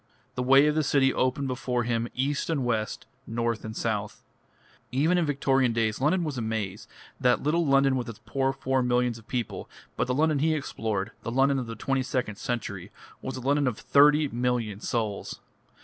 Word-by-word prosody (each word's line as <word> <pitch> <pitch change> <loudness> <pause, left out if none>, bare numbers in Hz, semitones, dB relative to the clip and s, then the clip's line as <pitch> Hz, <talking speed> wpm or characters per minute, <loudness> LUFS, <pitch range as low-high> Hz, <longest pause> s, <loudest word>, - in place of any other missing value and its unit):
The 125 - -3
ways 135 +3 +6
of - - +1
the 155 - +2
city 135 -2 +3
opened 130 +2 0
before 125 -1 -1
him 115 0 -1
east 140 +5 -1
and 145 -6 0
west, 110 -3 -2 0.2
north 115 0 -2
and 110 0 -6
south. 105 -2 -3 0.7
Even 150 +8 +2
in 175 -3 +1
Victorian 135 -3 +2
days 115 0 0
London 170 +6 +2
was 145 -6 -3
a - - -2
maze, 110 -3 -3 0.3
that 125 -1 +2
little 160 +2 +1
London 135 -1 +4
with 125 -2 -3
its 115 - -9
poor 135 -1 0
four 135 -1 0
millions 125 -1 +1
of 110 - -20
people; 120 -3 -4 0.3
but - - 0
the 125 - 0
London 155 0 +2
he 155 +2 +2
explored, 110 -7 -3
the - - -5
London 135 +3 +2
of 125 - -4
the 115 - -6
twenty 135 +4 0
second 125 -5 -2
century, 105 -7 -4 0.3
was 130 - -5
a - - -6
London 140 +2 +2
of 120 -4 -1
thirty 150 +1 +5
million 120 -4 -1
souls. 110 -3 -3
125 Hz, 195 wpm, -27 LUFS, 115-140 Hz, 0.7 s, ways